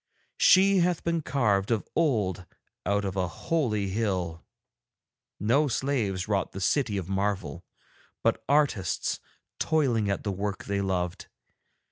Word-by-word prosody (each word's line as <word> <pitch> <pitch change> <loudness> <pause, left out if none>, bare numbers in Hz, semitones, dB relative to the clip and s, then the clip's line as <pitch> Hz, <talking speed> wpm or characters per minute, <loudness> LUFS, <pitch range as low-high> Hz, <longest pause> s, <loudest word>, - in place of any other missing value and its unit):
She 195 +1 +6
hath 175 -1 +1
been 170 -1 0
carved 105 -9 +1
of 115 -3 0
old 105 - +1 0.4
out 100 +1 +1
of 95 -1 -3
a 95 -1 0
holy 105 - -1
hill, 95 -5 -2 1.0
no 120 +9 +3
slaves 115 -8 -1
wrought 100 -2 -1
the 95 - -5
City 110 +1 +1
of 95 -3 -4
Marvel, 95 -6 -2 0.6
but - - +1
artists 140 - +1 0.4
toiling 125 -10 +1
at 100 - -1
the 100 - -1
work 100 +1 -3
they 100 0 -1
loved. 90 -2 -2
105 Hz, 130 wpm, -27 LUFS, 95-135 Hz, 1.0 s, She